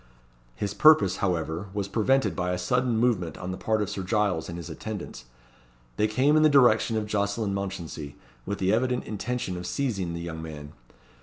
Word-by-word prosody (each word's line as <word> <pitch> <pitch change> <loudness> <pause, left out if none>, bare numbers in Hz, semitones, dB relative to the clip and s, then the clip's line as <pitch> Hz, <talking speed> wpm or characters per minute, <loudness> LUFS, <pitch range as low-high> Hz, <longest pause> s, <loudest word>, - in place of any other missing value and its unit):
His 100 +8 -3
purpose, 155 -12 +5
however, 85 0 -1
was 100 -2 -1
prevented 120 +7 +1
by 90 -1 -1
a - - -1
sudden 125 +6 +1
movement 105 -10 +1
on 95 0 -5
the - - -3
part 110 -1 0
of 100 - -4
Sir 95 - -4
Giles 95 -4 0
and 85 - -6
his 85 - -7
attendants. 100 - -7 0.7
They 105 - +3
came 130 +7 +3
in 155 - +5
the 155 - +6
direction 120 -5 +4
of 110 - -1
Jocelyn 100 0 -1
Mounchensey, 85 -7 -5 0.3
with 100 +1 -3
the 95 +2 +1
evident 125 +2 +1
intention 110 -2 -3
of 90 0 -6
seizing 100 -11 -2
the 85 - -5
young 80 -1 -6
man. 75 -2 -8
100 Hz, 185 wpm, -26 LUFS, 90-115 Hz, 0.7 s, the